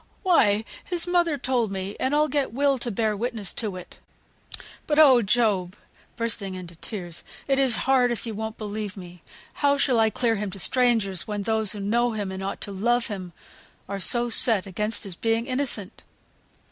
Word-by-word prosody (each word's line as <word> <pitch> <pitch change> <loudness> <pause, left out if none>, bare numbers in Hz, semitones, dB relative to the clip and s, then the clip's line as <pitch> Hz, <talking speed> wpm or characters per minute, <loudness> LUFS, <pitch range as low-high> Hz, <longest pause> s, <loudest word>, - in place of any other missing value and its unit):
"Why! 220 - +3 0.2
his 350 -2 -2
mother 345 -4 +2
told 250 -4 0
me, 195 +1 -4
and 265 +3 0
I'll 300 +1 +3
get 285 -5 -1
Will 275 +1 +2
to 240 - -2
bear 215 0 0
witness 220 -2 -2
to 210 -5 -4
it. 180 - -11 0.9
But, 295 - +1
oh! 270 -6 +7
Job" 200 -4 +1 0.4
(bursting 225 -5 -2
into 175 -2 -9
tears), 175 -4 -6 0.2
"it 270 -1 +2
is 260 -4 +4
hard 260 -2 +4
if 240 0 -3
you 225 - -4
won't 220 +1 -5
believe 210 -1 -5
me. 180 -2 -11 0.4
How 285 0 +4
shall 260 -4 +2
I 220 0 +4
clear 225 0 0
him 205 0 -3
to 190 - -8
strangers, 225 -5 +2
when 205 -1 -3
those 220 -1 +1
who 210 - -7
know 235 +4 +1
him, 205 -3 -3
and 190 0 -6
ought 195 +1 -4
to 200 - -4
love 235 +5 +1
him, 185 -4 -6 0.6
are 200 0 -4
so 240 +5 +2
set 225 -3 +3
against 210 +3 -1
his 195 -3 -7
being 225 +3 0
innocent?" 255 -7 -3
220 Hz, 185 wpm, -25 LUFS, 200-250 Hz, 0.9 s, oh